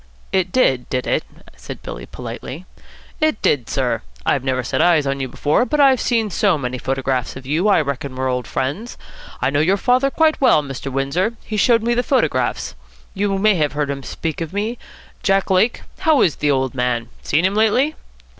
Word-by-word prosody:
"It 185 -1 +1
did, 130 - +2
did 125 -1 -1
it?" - - 0 0.3
said - - -9
Billy - - -7
politely. 160 +8 -8 0.5
"It 310 -7 +1
did, 130 -6 +1
sir. - - 0 0.2
I've 135 - +1
never 130 -1 0
set 125 - -1
eyes 165 -4 +4
on 135 0 -1
you 135 - -2
before, 145 - +1
but 300 +4 -1
I've 270 -3 +5
seen 225 -4 +1
so 190 -1 +2
many 125 -2 -4
photographs 130 -1 -2
of 130 0 -9
you 155 +8 0
that - - +4
I 200 - +4
reckon 140 -2 -4
we're 130 0 -1
old 125 -2 -2
friends. 150 - -3 0.5
I - - +2
know 145 - +1
your 185 +6 +3
father 255 +5 +2
very 320 -1 +5
well, 250 - +4
Mr. 135 -1 -6
Windsor. 140 - 0
He 215 - -5
showed 230 +2 +3
me 235 +1 +1
the 240 - +2
photographs. 150 - 0 0.4
You 195 0 0
may 210 +2 +4
have 150 -2 0
heard 145 -1 -1
him 140 -1 -5
speak 160 +4 -4
of 165 +1 -4
me 215 +4 -2 0.4
Jack 195 0 +1
Lake? 190 +6 +2 0.2
How 315 -3 +4
is 160 - +1
the 150 - 0
old 130 -2 +1
man? 125 -2 -1
Seen 155 +5 +1
him 190 - +2
lately?" 225 +8 +2
160 Hz, 200 wpm, -20 LUFS, 135-215 Hz, 0.5 s, I've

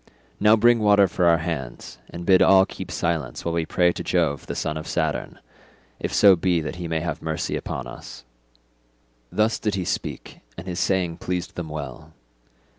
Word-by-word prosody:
Now 105 +1 +6
bring 120 +1 +4
water 100 -2 +5
for 90 - 0
our 85 -1 +5
hands, 75 -7 -5
and 85 0 -8
bid 95 0 +5
all 95 0 +6
keep 95 -2 -8
silence 80 -7 -2
while 85 - -1
we 85 -1 -1
pray 90 -1 +3
to - - -6
Jove 80 -6 0
the - - -4
son 75 - -2
of 80 +1 -6
Saturn, 75 -6 -2 0.6
if - - -3
so 100 -2 +6
be 90 0 +1
that 80 +2 -5
he 90 -1 -5
may 80 -1 -1
have 80 -2 -4
mercy 80 -1 -3
upon - - -4
us." 60 - -10 1.1
Thus 110 +1 +1
did 105 -3 -1
he 95 -2 -2
speak, - - -4 0.2
and 85 - -8
his 90 -2 -4
saying 90 -4 0
pleased 90 -1 -4
them 85 -3 -6
well. 75 +1 -7
85 Hz, 190 wpm, -23 LUFS, 80-95 Hz, 1.1 s, Now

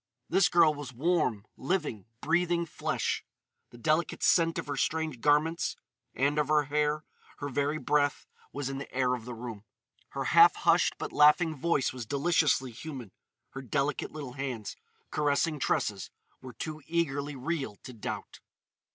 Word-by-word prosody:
This 190 -2 +4
girl 165 -3 +5
was 145 -3 -7
warm, 125 - 0
living, 135 - -2
breathing 170 +2 +1
flesh. - - -2 0.5
The 120 - -14
delicate 155 +6 0
scent 165 -1 +4
of - - -3
her 145 - -3
strange 155 -1 -1
garments 160 +4 +2 0.4
and 145 +3 +1
of 150 - +1
her 150 0 +3
hair, 150 +1 0 0.3
her 145 - -4
very 145 +3 0
breath, 145 -2 +1 0.3
was 140 -2 -4
in 135 0 -4
the 140 - -8
air 125 -1 +1
of 120 -3 -4
the 125 -1 -6
room. 115 -3 -7 0.5
Her - - -4
half - - +7
hushed - - +3
but - - -5
laughing 155 +2 +5
voice 145 -2 0
was 125 -4 -7
deliciously 145 -2 +2
human; 125 -3 -8 0.4
her 135 - -7
delicate 140 +3 -1
little 145 -5 -7
hands, 130 -6 -4 0.4
caressing 150 +1 +1
Tressa's, 100 -6 -1 0.3
were 130 -1 -9
too 155 -1 -6
eagerly 145 -4 -1
real 135 -4 -3
to 130 - -9
doubt. 110 - -6
145 Hz, 155 wpm, -29 LUFS, 130-155 Hz, 0.5 s, half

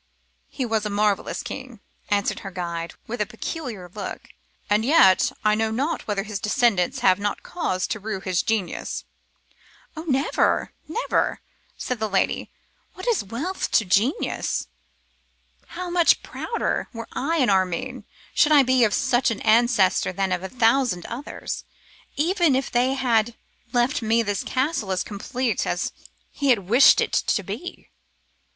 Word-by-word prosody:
'He 260 - -3
was 220 -2 0
a 210 - -2
marvellous 205 0 0
being,' 255 -4 -8 0.3
answered 200 -1 0
her 195 - -7
guide, 170 -2 -5
with 235 0 -4
a - - +2
peculiar 225 - -6
look, 205 -3 -6 0.4
'and 210 +1 +2
yet 245 - +5
I 210 - +5
know 220 +1 +1
not 280 +9 -2
whether 205 -2 -1
his 210 -1 -5
descendants 210 -5 +1
have 185 0 +4
not 205 0 -2
cause 185 - -2
to 220 - -3
rue 210 -1 -4
his 185 -2 0
genius.' 220 -5 -2 0.9
'Oh! 315 - -5
never, 275 -1 +1
never!' 455 +11 -1 0.4
said 250 -2 -3
the 220 0 -1
lady; 195 - 0 0.5
'what 370 - -8
is 460 - +2
wealth 260 - -3
to 220 - +4
genius? 205 +9 0 1.0
How 360 0 -6
much 345 -1 +4
prouder, 460 - -3
were 230 -1 -7
I 325 +5 -1
an 255 -8 +3
Armine, 190 +7 0 0.3
should 305 - +4
I 290 -2 +7
be 255 -1 +3
of 215 - +3
such 260 -2 +2
an 230 - -3
ancestor 225 -5 +3
than 190 0 -1
of 180 -1 0
a 190 - -5
thousand 230 -5 +2
others, 260 +5 -6 0.5
even 335 -1 +2
if 265 0 -1
they 250 +2 +2
had 235 -3 +1 0.4
left 245 +1 +1
me 225 +1 +2
this 205 -2 -2
castle 260 -6 -1
as 185 -1 0
complete 240 +4 -2
as - - -1 0.4
he 280 -2 +1
wished 220 +8 +5
it - - -1
to 200 - +1
be! 230 - -7
230 Hz, 155 wpm, -24 LUFS, 200-265 Hz, 1.0 s, I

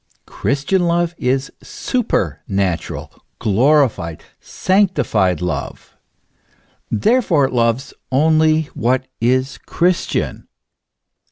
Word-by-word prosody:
Christian 160 +7 0
love 170 0 +1
is 130 +1 0
supernatural, 95 - -2 0.3
glorified, 115 - +1 0.2
sanctified 110 - +1
love; 90 -2 -5 0.9
therefore 160 - +2
it 130 - -4
loves 115 +1 0 0.2
only 155 +3 +3
what 130 +3 0 0.2
is 130 +3 +1
Christian. 175 +1 -1
135 Hz, 75 wpm, -18 LUFS, 110-165 Hz, 0.9 s, only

